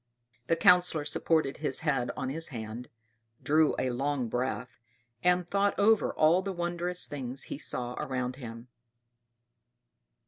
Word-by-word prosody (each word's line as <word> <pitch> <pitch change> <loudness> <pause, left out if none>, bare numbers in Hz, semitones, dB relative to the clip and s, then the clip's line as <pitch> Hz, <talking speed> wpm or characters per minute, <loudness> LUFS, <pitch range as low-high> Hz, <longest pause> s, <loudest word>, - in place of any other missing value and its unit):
The 165 - +3
Councillor 180 -4 +4
supported 155 -4 +1
his 145 -3 -1
head 135 -6 0
on 130 - -2
his 165 +3 -3
hand, 115 -1 -7 0.5
drew 155 +1 +3
a 130 - 0
long 135 -1 -1
breath, 125 0 -3 0.4
and 180 -1 +3
thought 200 +2 +1
over 220 +1 +4
all 165 +4 +4
the 195 +1 -3
wondrous 175 0 -2
things 130 -2 -5
he - - -6
saw 125 -4 -2
around 130 -3 -3
him. 115 -2 -9
145 Hz, 135 wpm, -29 LUFS, 125-175 Hz, 0.5 s, Councillor